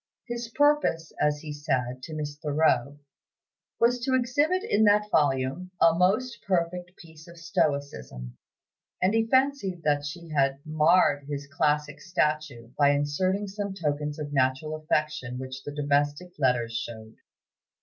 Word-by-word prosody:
His 240 -1 -4
purpose, 290 - +1
as 150 0 +1
he 150 -2 -6
said 130 -4 -2
to 155 +3 -7
Miss 145 -1 -4
Thoreau, 145 -3 +1 0.8
was 245 +1 +3
to 260 +2 0
exhibit 290 +9 +1
in 220 - +2
that 210 0 +3
volume 140 +3 +1
"a 165 - +6
most 215 +8 +1
perfect 180 -1 -2
piece 160 -2 -15
of 170 0 -13
stoicism," 140 - -2 0.6
and 185 +3 +2
he 225 0 +2
fancied 260 - +1
that 145 -1 +1
she 165 +3 -7
had 135 -3 +1
"marred 155 -2 +3
his 145 -1 -4
classic 150 +1 -1
statue" 150 -9 -1
by 145 -1 +6
inserting 145 +8 0
some 200 0 -5
tokens 150 -3 -2
of 145 -1 -6
natural 135 +3 +1
affection 150 -5 -2
which 130 0 -7
the 145 - -7
domestic 145 +3 0
letters 125 -4 +1
showed. 110 -1 -6
155 Hz, 140 wpm, -27 LUFS, 140-185 Hz, 0.8 s, a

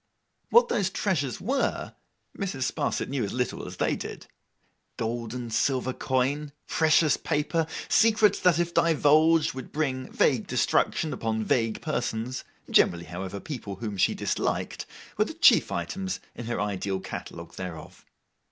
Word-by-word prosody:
What 475 +1 +6
those 200 - +1
treasures 150 - -1
were, 265 +6 -1 0.4
Mrs. 140 - -2
Sparsit - - -1
knew 135 -3 -2
as 100 - -3
little 125 0 -2
as - - -9
they - - +1
did. - - -7 0.7
Gold 115 0 -3
and 120 -2 -5
silver 130 0 +1
coin, 140 +4 -1
precious 155 -1 +3
paper, 155 +2 0 0.2
secrets 215 -2 +4
that 180 -3 +4
if 170 0 0
divulged 160 0 +4
would 130 -1 -8
bring 135 -4 -2
vague - - +2
destruction 155 - +1
upon 110 -1 -2
vague 115 -3 0
persons 120 +1 -2 0.3
(generally, 85 0 +4
however, 95 +2 -6
people 105 -6 -6
whom 105 -2 -5
she 95 - +2
disliked), - - -2 0.3
were - - +4
the - - -7
chief - - +5
items 185 - -3
in 120 - -7
her 120 - -2
ideal 100 -1 -2
catalogue 85 -2 -8
thereof. 90 -3 -8
130 Hz, 145 wpm, -27 LUFS, 110-165 Hz, 0.7 s, What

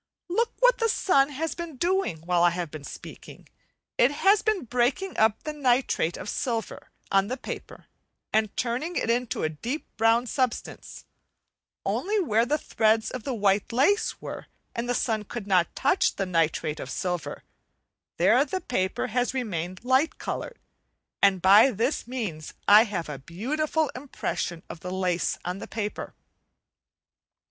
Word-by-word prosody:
Look 460 +6 +1
what - - +5
the 455 -1 +2
sun 280 -10 +3
has 310 +3 -3
been 335 -5 -7
doing 350 - 0
while 175 +1 +1
I 175 - +6
have 170 -2 -4
been 155 -2 -8
speaking. - - -10 0.5
It 245 - +6
has 390 +8 +3
been 430 - 0
breaking 250 - 0
up 220 0 +2
the 305 - -4
nitrate 255 - +1
of 190 - -7
silver 230 +1 -3 0.2
on 195 0 +3
the 255 +4 -3
paper - - -8 0.5
and 215 -1 +1
turning 255 +9 -2
it 230 - +1
into 240 0 -1
a 155 - +1
deep 235 - -4
brown 225 +2 +3
substance; 255 0 -3 0.8
only 420 +3 0
where 230 - +2
the 300 +4 +2
threads 220 -5 +1
of 255 -4 -6
the 265 - -2 0.4
lace 295 - +2
were, - - -7 0.3
and 235 +1 -3
the 245 - +1
sun 220 -4 0
could 210 0 -6
not 185 -4 +2
touch 285 +8 +2
the 195 - -1
nitrate 165 -3 0
of - - -6
silver, 180 -3 -3 0.7
there - - +5
the 375 - -3
paper 190 - -1
has 245 +3 -1
remained 185 -4 -3
light 260 +5 +2
coloured, 480 - -5 0.6
and 190 -3 +4
by 205 +7 +8
this 240 +4 -1
means 205 - -5
I 210 +3 +8
have 185 -6 -4
a 145 -3 -6
beautiful 295 - -1
impression 220 - -4
of - - -8
the 180 - -6
lace 180 -3 0
on 180 +2 -3
the - - -7
paper. 210 -2 -5
235 Hz, 155 wpm, -26 LUFS, 185-285 Hz, 0.8 s, by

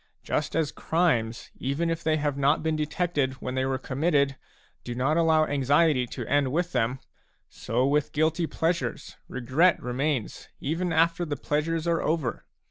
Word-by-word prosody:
Just 150 - -2
as 160 -3 +1
crimes, 125 -10 0
even 145 +6 -1
if 165 0 -3
they 155 0 +2
have 145 -2 -1
not 140 +3 +2
been 160 -1 0
detected 150 -3 -1
when 130 -1 -6
they 130 0 0
were 135 0 0
committed, 140 +1 +1 0.5
do 120 - -5
not 135 +5 +1
allow 160 -2 +4
anxiety 145 -1 +2
to - - -6
end 140 -2 +1
with 175 +4 0
them; 125 0 0 0.5
so 120 +4 -1
with 145 +1 +1
guilty 160 +2 +1
pleasures, 170 +2 -2
regret 130 +9 +2
remains 130 0 -2
even 165 +5 -2
after 165 +1 +2
the 150 -4 -3
pleasures 155 +4 -1
are 170 -1 +1
over. 155 -6 -1
150 Hz, 160 wpm, -27 LUFS, 130-165 Hz, 0.5 s, allow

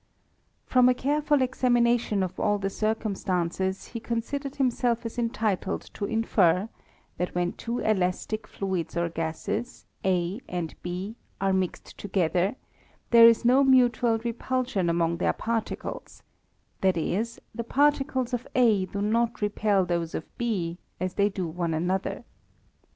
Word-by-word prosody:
From 250 -1 +5
a 250 - +3
careful 290 +1 +2
examination 240 -5 +2
of 185 - -5
all 205 -1 +2
the 195 -1 -2
circum 215 0 -1
stances, 190 +1 -2
he 230 - -5
considered 265 +5 -3
himself 245 -3 +1
as 230 +2 -4
entitled 225 -4 -1
to 200 - -3
infer, 200 -3 +2 0.5
that 180 0 -2
when 175 0 +1
two 235 +1 -4
elastic 210 +1 -1
fluids 185 -4 -3
or 170 0 +1
gases, 165 +9 -4 0.2
A 185 +3 0
and 175 -3 -3
B, 185 +6 -5 0.2
are 195 0 +1
mixed 190 -2 -3
together, 185 0 0 0.6
there 230 -1 +9
is 230 +1 +4
no 260 +3 +6
mutual 245 -3 +4
repulsion 235 -4 -1
among 170 0 +1
their - - +1
particles; 225 -1 -4 0.6
that 190 -2 +3
is, 215 +8 -1
the 235 - -4
particles 270 -1 +1
of 245 +1 -2
A 220 -7 +4
do 200 +2 -3
not 230 +2 +1
repel 205 -2 +1
those 170 -2 -2
of 160 - -7
B, 185 -8 -2 0.2
as 185 0 -2
they 200 0 +2
do 190 -2 -3
one 165 0 -2
another. 180 +4 -1
210 Hz, 140 wpm, -27 LUFS, 180-240 Hz, 0.6 s, there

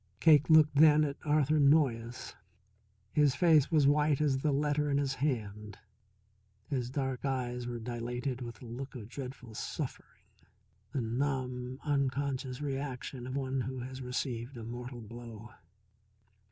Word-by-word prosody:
Cake 155 -2 +6
looked 155 -2 +6
then 155 0 +7
at 140 -1 -2
Arthur 150 0 +3
Noyes. 130 -5 +2 0.8
His 145 -3 +4
face 155 -3 +5
was 155 -4 +4
white 150 0 +3
as 140 -3 +2
the 150 +2 +1
letter 150 +1 +1
in 140 - +2
his 140 -1 0
hand, 105 -7 -3 0.9
his 125 -3 -2
dark 130 -1 -2
eyes 125 -3 -2
were 120 -1 -4
dilated 120 +2 -4
with 120 -1 -8
a - - -8
look 130 +4 -7
of 110 -3 -8
dreadful 125 -3 -8
suffering, - - -6 0.7
the 135 - -1
numb, 125 +1 -2
unconscious 140 -2 -1
reaction 135 -3 -4
of 130 - -4
one 135 -1 -1
who 130 0 -4
has 130 +1 -7
received 125 0 -3
a 115 - -7
mortal 120 +1 -7
blow. 115 0 -10
130 Hz, 140 wpm, -32 LUFS, 120-145 Hz, 0.9 s, then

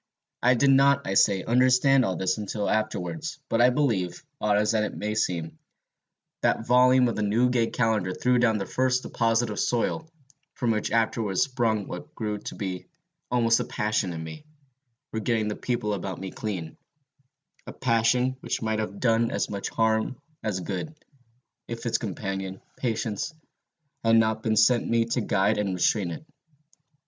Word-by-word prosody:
I 125 +1 +4
did 135 +3 +4
not, 140 +1 +4
I 95 - -2
say, 95 -1 +3
understand 130 +2 +4
all 95 -5 -1
this 95 +3 -1
until 105 0 -3
afterwards; 110 - -2
but 115 - +2
I 125 - +7
believe, 110 -11 -1 0.2
odd 105 -1 +2
as 105 +2 +2
it 105 -1 -1
may 105 0 -2
seem, 85 -6 -2 0.8
that 115 - +1
volume 125 +1 +5
of 115 - -2
the - - -2
Newgate 115 +3 +2
Calendar 110 -6 +1
threw 125 +6 +1
down 115 -3 +3
the 100 - -3
first 130 +3 0
deposit 115 0 0
of 105 - -4
soil, 160 +7 -1 0.5
from 120 -3 0
which 105 -1 -1
afterwards 110 -3 +1
sprung 115 -6 -1
what 150 +1 -8
grew 105 -2 -3
to - - -7
be 95 -3 -5 0.4
almost 115 -2 +3
a - - 0
passion 105 -3 -1
in 80 -1 -5
me, 80 - -9 0.7
for 110 - -2
getting 110 -1 0
the 105 - -3
people 110 -4 -2
about 95 -2 -4
me 95 0 -6
clean, 90 -7 -5 0.9
a - - -5
passion 125 +1 +1
which - - -3
might 110 -1 0
have 100 -2 -4
done 115 -1 +2
as - - -2
much 100 -1 -3
harm 110 +2 0 0.2
as 100 -4 -2
good, 100 - -5 0.7
if 115 0 -6
its 120 - +1
companion, 95 -2 -4 0.2
patience, 115 +4 -3 0.7
had 115 0 +4
not 110 -1 +3
been 110 -1 0
sent 115 +2 +4
me 115 0 +2
to 115 +2 -1
guide 105 +1 +1
and 100 -3 -1
restrain 90 +1 +1
it. 85 - -7
110 Hz, 170 wpm, -26 LUFS, 100-125 Hz, 0.9 s, I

